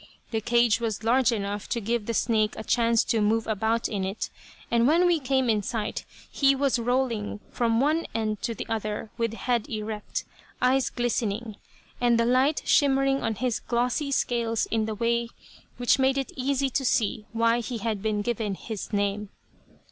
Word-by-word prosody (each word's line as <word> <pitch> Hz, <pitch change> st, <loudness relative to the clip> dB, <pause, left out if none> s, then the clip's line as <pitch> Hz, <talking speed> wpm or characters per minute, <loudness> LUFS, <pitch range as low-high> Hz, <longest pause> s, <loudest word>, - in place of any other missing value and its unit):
The 220 Hz, -1 st, -1 dB
cage 235 Hz, 0 st, +3 dB
was 225 Hz, -2 st, -3 dB
large 245 Hz, +2 st, +3 dB
enough 205 Hz, -2 st, -3 dB
to 235 Hz, -, 0 dB
give 230 Hz, 0 st, -2 dB
the 230 Hz, -, -1 dB
snake 215 Hz, -2 st, +1 dB
a -, -, -5 dB
chance 230 Hz, 0 st, +3 dB
to 225 Hz, -, 0 dB
move 220 Hz, +2 st, +2 dB
about 220 Hz, +2 st, 0 dB
in 200 Hz, -3 st, -3 dB
it, 195 Hz, +3 st, -3 dB, 0.4 s
and 235 Hz, +1 st, +4 dB
when 335 Hz, +5 st, +4 dB
we 350 Hz, -2 st, +3 dB
came 265 Hz, -1 st, +1 dB
in 215 Hz, -2 st, +2 dB
sight 210 Hz, +1 st, -3 dB, 0.3 s
he 275 Hz, -1 st, +3 dB
was 270 Hz, -2 st, +1 dB
rolling 235 Hz, -4 st, -1 dB
from 230 Hz, -1 st, +1 dB
one 305 Hz, +5 st, +1 dB
end 215 Hz, -2 st, -1 dB
to 230 Hz, -, -2 dB
the -, -, -5 dB
other 215 Hz, -1 st, -3 dB
with 230 Hz, -1 st, 0 dB
head 240 Hz, -1 st, -1 dB
erect, 215 Hz, -1 st, -4 dB, 0.3 s
eyes 260 Hz, +1 st, +2 dB
glistening, 230 Hz, -2 st, -2 dB, 0.5 s
and 240 Hz, -1 st, +3 dB
the 230 Hz, -, +3 dB
light 260 Hz, +5 st, +2 dB
shimmering 275 Hz, -1 st, +3 dB
on 225 Hz, -1 st, -1 dB
his 245 Hz, +2 st, -1 dB
glossy 250 Hz, +4 st, -1 dB
scales 235 Hz, -4 st, 0 dB
in 220 Hz, -1 st, 0 dB
a 215 Hz, -, -3 dB
way 235 Hz, +1 st, 0 dB, 0.5 s
which 245 Hz, +2 st, +3 dB
made 265 Hz, +1 st, +3 dB
it 270 Hz, -, -2 dB
easy 270 Hz, +1 st, 0 dB
to 270 Hz, -, 0 dB
see 215 Hz, -3 st, 0 dB
why 230 Hz, +1 st, +2 dB
he 240 Hz, 0 st, -4 dB
had 215 Hz, -2 st, -2 dB
been 210 Hz, -1 st, -1 dB
given 215 Hz, -3 st, -2 dB
his 215 Hz, +1 st, -6 dB
name. 205 Hz, 0 st, -1 dB
230 Hz, 180 wpm, -26 LUFS, 215-250 Hz, 0.5 s, and